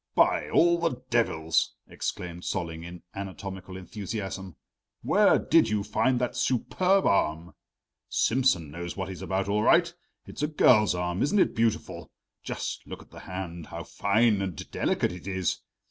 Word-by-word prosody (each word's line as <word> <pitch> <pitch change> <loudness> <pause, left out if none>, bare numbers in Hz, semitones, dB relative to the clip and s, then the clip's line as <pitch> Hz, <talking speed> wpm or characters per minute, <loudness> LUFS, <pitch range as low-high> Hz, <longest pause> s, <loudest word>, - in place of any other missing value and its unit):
"By - - +3
all 170 0 +4
the 165 -7 -1
devils," 80 -9 +1
exclaimed 90 -1 -5
Solling 85 -3 -3
in 85 0 -9
anatomical 95 -1 -7
enthusiasm, 95 -2 -6 0.5
"where - - +5
did - - +3
you 105 -1 0
find 125 +4 +1
that 125 0 -1
superb 180 +10 +1
arm? 80 -3 +1 0.6
Simsen 115 - +2
knows 85 +3 -6
what 95 0 -3
he's 95 - -7
about 95 0 -1
all 105 +1 +1
right. 170 +9 +4 0.3
It's - - -8
a 150 - +2
girl's 110 - +4
arm; 90 0 -2
isn't 175 +9 +2
it 190 - +3
beautiful? 115 -1 -1 0.3
Just - - -4
look - - -8
at - - -27
the - - -11
hand 90 -3 -6
how 85 0 -6
fine 105 +2 +2
and 95 -6 -5
delicate - - 0
it 90 +1 -9
is! 95 -3 -1
95 Hz, 155 wpm, -27 LUFS, 90-120 Hz, 0.6 s, where